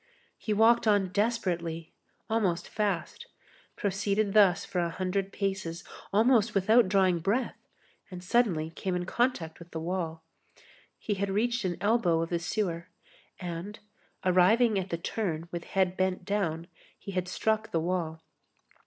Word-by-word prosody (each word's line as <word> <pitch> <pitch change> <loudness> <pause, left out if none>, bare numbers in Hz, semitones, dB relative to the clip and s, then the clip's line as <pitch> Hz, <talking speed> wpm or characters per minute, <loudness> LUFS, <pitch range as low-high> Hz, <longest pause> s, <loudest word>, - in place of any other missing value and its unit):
He 215 - -4
walked 225 +2 +4
on 205 -3 +3
desperately, 175 -6 -1 0.3
almost 210 -7 0
fast, 205 -5 -2 0.5
proceeded 200 +1 0
thus 200 -5 +5
for 180 - -2
a 170 -1 0
hundred 185 +2 -2
paces, 190 -4 -3 0.3
almost 220 0 +3
without 215 +2 +4
drawing 185 -3 +3
breath, 210 +10 -2 0.4
and 180 -1 -8
suddenly 180 -7 +1
came 185 +2 -3
in 180 0 -2
contact 190 -8 -1
with 170 0 -12
the 160 - -5
wall. 165 -1 -3 0.7
He 210 - -2
had 200 0 -2
reached 235 +3 0
an 175 -2 -1
elbow 200 -5 +2
of 165 - -6
the 170 - +1
sewer, 170 -2 -2 0.5
and, 180 +4 -5 0.5
arriving 200 +5 +4
at 190 0 -5
the 170 - -2
turn 170 -2 -3
with 170 -1 -5
head 185 -1 +1
bent 185 -1 -1
down, 180 -5 -1 0.3
he 200 - -8
had 185 -1 -2
struck 220 +4 0
the 165 - 0
wall. 165 -2 -2
190 Hz, 145 wpm, -29 LUFS, 170-210 Hz, 0.7 s, thus